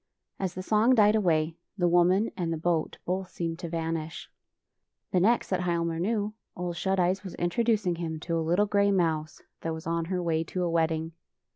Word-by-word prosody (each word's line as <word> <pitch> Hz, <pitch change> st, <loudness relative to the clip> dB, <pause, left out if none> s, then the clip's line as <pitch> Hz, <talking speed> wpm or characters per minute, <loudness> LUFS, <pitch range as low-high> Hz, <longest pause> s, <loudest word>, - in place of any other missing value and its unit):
As 185 Hz, -2 st, -2 dB
the 185 Hz, -, -4 dB
song 220 Hz, +6 st, +4 dB
died 210 Hz, -2 st, +6 dB
away, 165 Hz, -5 st, +1 dB, 0.2 s
the 175 Hz, -2 st, +2 dB
woman 180 Hz, +5 st, +3 dB
and 175 Hz, -3 st, -2 dB
the 165 Hz, -, -1 dB
boat 165 Hz, 0 st, 0 dB
both 185 Hz, +1 st, -2 dB
seemed 165 Hz, -2 st, -4 dB
to 170 Hz, -, -5 dB
vanish. 165 Hz, -1 st, -4 dB, 0.8 s
The 185 Hz, -, +3 dB
next 230 Hz, +7 st, +2 dB
that 185 Hz, -, +2 dB
Hialmar 170 Hz, -2 st, -1 dB
knew. 210 Hz, +2 st, 0 dB, 0.2 s
Ole 180 Hz, -1 st, -2 dB
Shut 190 Hz, +3 st, 0 dB
Eyes 185 Hz, +2 st, +1 dB
was 190 Hz, -, -7 dB
introducing 205 Hz, -1 st, +1 dB
him 160 Hz, -2 st, -4 dB
to 170 Hz, 0 st, -2 dB
a 165 Hz, -, +1 dB
little 175 Hz, +6 st, +2 dB
gray 200 Hz, 0 st, +2 dB
mouse 160 Hz, -5 st, 0 dB, 0.2 s
that 165 Hz, -1 st, -2 dB
was 160 Hz, -, -9 dB
on 165 Hz, 0 st, -1 dB
her 180 Hz, +1 st, -2 dB
way 165 Hz, -1 st, +1 dB
to 180 Hz, +2 st, -3 dB
a 175 Hz, -, 0 dB
wedding. 160 Hz, -1 st, 0 dB
175 Hz, 195 wpm, -28 LUFS, 165-190 Hz, 0.8 s, died